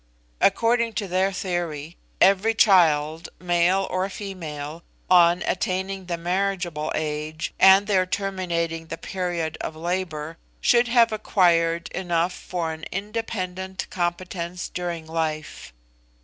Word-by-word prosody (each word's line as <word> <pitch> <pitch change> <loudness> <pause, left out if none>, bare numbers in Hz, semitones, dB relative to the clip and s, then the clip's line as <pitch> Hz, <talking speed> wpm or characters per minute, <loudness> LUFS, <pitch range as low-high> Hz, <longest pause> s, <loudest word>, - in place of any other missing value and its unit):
According 235 0 +3
to 205 -2 -3
their 190 +2 +1
theory, 175 -4 -3 0.2
every 200 +4 +4
child, 160 -6 +4
male 180 +2 +2
or 185 +1 -1
female, 165 -6 -6 0.3
on 175 0 +6
attaining 190 +1 -2
the 170 -1 -2
marriageable 175 -3 -1
age, 155 +1 -3
and 190 +1 +7
there 190 -3 +2
terminating 170 -4 -2
the 165 - -5
period 175 -4 -3
of 155 - -5
labour, 165 -2 -3 0.2
should 240 0 +4
have 235 -1 +4
acquired 170 -5 +2
enough 175 -1 -1
for 170 -4 -4
an 160 0 -10
independent 190 -2 -4
competence 175 0 -3
during 175 -2 -4
life. 160 -1 -4
180 Hz, 115 wpm, -24 LUFS, 165-190 Hz, 0.3 s, and